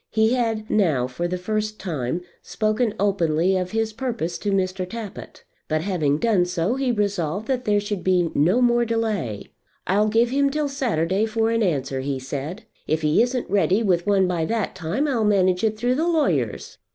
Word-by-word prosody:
He 220 +2 +2
had 225 -3 -1
now, 160 - +2
for 130 +8 -3
the 180 +1 -2
first 215 +3 -3
time, 155 -3 -3 0.2
spoken 215 0 -1
openly 185 -3 +2
of 180 -1 -1
his 220 +1 -1
purpose 225 -8 -3
to 205 - -2
Mr. 185 -1 -1
Tappitt; 225 -3 -8 0.2
but, 155 0 0
having 160 -6 0
done 200 -1 +2
so, 180 +4 -1
he 265 -1 0
resolved 200 -3 -1
that 255 -2 -1
there 205 -1 +3
should 205 -2 -4
be 180 -3 +2
no 185 - +3
more 240 0 +3
delay. 215 - -2 0.3
"I'll 205 +3 +2
give 230 +3 +2
him 280 +1 +2
till 295 0 -1
Saturday 215 - 0
for 225 0 0
an 230 0 +1
answer," 135 -8 0
he 135 0 -2
said. 145 - -5 0.2
"If 155 +1 0
he 150 +5 +3
isn't 245 +1 0
ready 200 +2 +2
with 180 -3 +1
one 195 -2 +3
by 175 -3 -1
that 225 +3 -1
time 180 - -2
I'll 245 -6 0
manage 185 -3 +2
it 215 -1 +1
through 245 +3 +1
the 315 +6 0
lawyers." 320 -4 0
205 Hz, 190 wpm, -23 LUFS, 175-230 Hz, 0.3 s, there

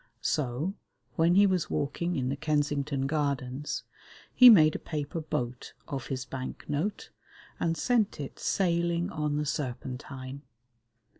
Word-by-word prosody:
So, 150 +5 -1 0.4
when 165 +2 +4
he 200 +1 +7
was 185 -4 +1
walking 170 +5 -1
in 130 -1 -1
the 135 - -1
Kensington 145 -2 0
Gardens, 140 -2 -2 0.5
he 250 -1 +10
made 155 -9 +7
a - - -2
paper 150 +1 -4
boat 130 -6 -4
of 135 -5 -4
his 130 -1 -3
bank 130 -1 -6
note, 155 +8 -2 0.5
and 165 -1 0
sent 225 0 +1
it 140 - -6
sailing 170 0 +1
on 150 -2 -1
the 150 - -1
Serpentine. 130 -1 -5
150 Hz, 135 wpm, -29 LUFS, 135-170 Hz, 0.5 s, he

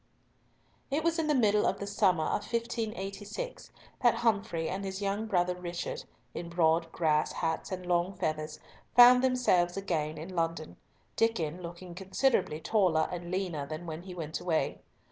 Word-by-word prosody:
It 295 +3 0
was 335 0 +1
in 320 - 0
the 300 - +3
middle 210 -4 +3
of 195 - 0
the 200 - -3
summer 195 -5 +2
of - - -2
1586 225 - -4 0.3
that 240 -2 +5
Humfrey 210 -7 0
and 190 +3 -3
his 190 0 -4
young 205 +2 -1
brother 180 -3 +2
Richard, 175 -1 -5 0.3
in 170 0 -5
broad 165 -1 +2
grass 155 -2 +1
hats 160 +3 -2
and 185 -1 -4
long 175 +2 +1
feathers, 155 0 -3 0.4
found 250 +1 +9
themselves 195 -9 +2
again 160 -5 -2
in 175 +4 -7
London, 165 -2 -2 0.4
Diccon 180 -7 0
looking 175 +1 -8
considerably 190 - +1
taller 175 -5 +2
and 175 -1 -5
leaner 175 -6 -2
than 155 +3 -6
when 160 0 -5
he 180 0 -9
went 155 -3 -4
away. 170 -3 0
180 Hz, 160 wpm, -30 LUFS, 165-210 Hz, 0.4 s, found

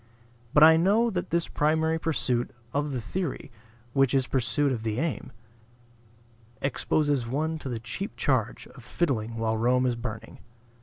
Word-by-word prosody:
But 150 - +8
I 160 0 +8
know 210 +7 +3
that 180 -3 -3
this 170 0 0
primary 160 +2 +1
pursuit 130 -6 -1 0.2
of 145 +1 -1
the 130 - -2
theory 150 - -4 0.4
(which 135 -1 +3
is 135 -1 +3
but - - -19
pursuit 130 +3 +1
of 120 -4 -2
the 110 +1 -2
aim) 165 0 -3 1.3
exposes 140 -1 0
one 155 +6 -1
to 140 - -6
the 120 - -3
cheap 115 - -6
charge 125 -5 0
of 125 - -15
fiddling 115 -6 -1
while 110 0 0
Rome 125 +3 +2
is 125 -1 +1
burning. 110 -2 -7
135 Hz, 160 wpm, -27 LUFS, 120-160 Hz, 1.3 s, But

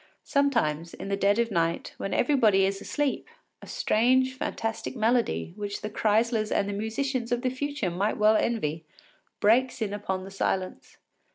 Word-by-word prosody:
Sometimes, 225 - 0
in 195 - -7
the 200 - +1
dead 200 +1 +2
of 235 -1 +1
night, 165 -2 -1
when 195 - -4
everybody 225 -8 +3
is 195 0 -2
asleep, 290 - -2 0.3
a - - -12
strange, 255 +4 +2
fantastic 225 -1 -4
melody, 230 -6 +1
which 205 -1 -5
the 210 - -5
Kreislers 220 0 +1
and 200 - +1
the 205 - -3
musicians 235 +4 -2
of 245 +1 0
the 255 - +1
future 275 -7 -2
might 195 +5 -1
well 215 +1 +5
envy, 165 -10 -1 0.6
breaks 245 +5 +3
in 210 -3 -2
upon 190 -2 -3
the 195 - -9
silence. 190 -1 -3
215 Hz, 165 wpm, -27 LUFS, 195-245 Hz, 0.6 s, well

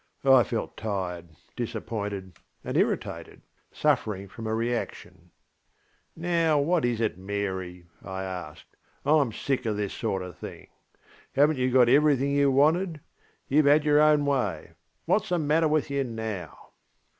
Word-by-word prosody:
I 135 -2 +7
felt 115 -2 -3
tired, 90 -5 -4 0.3
disappointed, 100 -5 -5 0.3
and - - -4
irritatedŌĆösuffering 100 -2 -2
from 115 -2 -7
a 110 - 0
reaction. 120 +1 -4 0.9
ŌĆśNow, 165 -4 +2
what 165 -2 +1
is 120 -2 0
it, 110 -5 -1
Mary? 95 -3 -4 0.2
ŌĆÖ - - -12
I 95 0 -4
asked; 90 -5 -8 0.3
ŌĆśIŌĆÖm 145 -7 +3
sick 130 -3 0
of 105 -2 -1
this 105 -2 -2
sort 100 -5 -2
of 90 -3 -9
thing. - - -9 0.7
HavenŌĆÖt 145 +1 +4
you 130 0 +1
got 125 -1 +5
everything 140 0 +4
you 140 0 +3
wanted? 155 +4 +2 0.5
YouŌĆÖve 150 +2 +4
had 150 +1 +5
your 150 0 +5
own 150 -1 +4
way. 130 -10 -1 0.4
WhatŌĆÖs - - +1
the 180 - +1
matter 155 +1 +2
with 150 -2 0
you 140 0 0
now? 110 -6 -6
125 Hz, 145 wpm, -27 LUFS, 100-145 Hz, 0.9 s, I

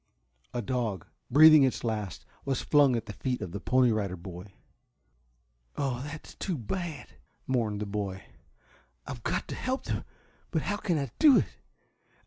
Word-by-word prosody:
A 120 -1 -3
dog, 110 -6 -2 0.2
breathing 155 +3 +9
its 130 -2 +2
last, 105 -5 -3 0.2
was 135 -2 -1
flung 145 -4 +5
at 115 - -2
the 105 - -7
feet 125 +4 -2
of 90 - -5
the 100 - -4
Pony 125 +1 +3
Rider 100 -4 -1
Boy. 90 +2 -10 1.2
"Oh, 130 -3 -1
that's 150 +1 -8
too 185 -5 -3
bad," 150 - -4 0.4
mourned 110 -5 0
the - - -1
boy. 100 -2 -4 0.8
"I've 120 - -7
got - - -2
to - - -3
help 260 +1 -2
them! - - -3 0.5
But 160 - -1
how 205 +2 -1
can 175 -6 0
I 140 -5 -2
do 295 -4 +8
it? - - +3
125 Hz, 160 wpm, -29 LUFS, 105-145 Hz, 1.2 s, breathing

